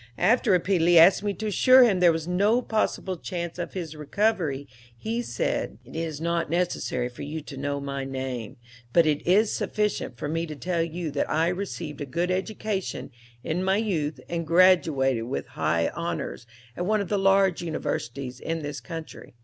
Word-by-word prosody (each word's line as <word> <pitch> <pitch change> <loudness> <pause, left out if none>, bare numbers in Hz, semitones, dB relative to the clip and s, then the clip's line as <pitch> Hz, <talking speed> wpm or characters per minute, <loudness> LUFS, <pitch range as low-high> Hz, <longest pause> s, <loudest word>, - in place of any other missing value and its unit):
After 225 +5 +3
repeatedly 175 -2 +4
asking 185 +5 +7
me 200 - +1
to 220 - -5
assure 255 +5 +6
him 205 -6 +3
there 175 -1 +6
was 165 0 -3
no 205 +7 +2
possible 205 -4 -1
chance 170 0 -5
of 175 - -4
his 165 -5 -5
recovery 155 -3 0 0.3
he 225 - -2
said: - - -2
"'It - - -13
is 160 -2 -3
not 170 0 -1
necessary 170 -7 -1
for 125 - -11
you 150 +3 -4
to 145 -1 -10
know 140 +1 -2
my 140 -1 -4
name, 130 -4 -5 0.4
but 170 -1 +5
it 150 -2 +1
is 205 +4 +4
sufficient 210 - -1
for 145 - -4
me 165 +2 -2
to 155 - -6
tell 175 +3 -1
you 165 -1 -3
that 140 - -1
I 160 +2 +2
received 175 -5 -5
a 145 - -4
good 170 +6 -1
education 195 -2 -3 0.3
in 175 +4 -1
my 190 +1 +2
youth 160 - -1
and 170 -2 -3
graduated 160 -9 +4
with 130 - -3
high - - 0
honors 65 - -4 0.3
at 175 - -3
one 215 0 +2
of 195 - -5
the 205 - +1
large 195 -2 +3
universities 135 -6 -4
in 165 -1 -3
this 145 0 -4
country. 165 -7 -9
170 Hz, 180 wpm, -26 LUFS, 145-190 Hz, 0.4 s, asking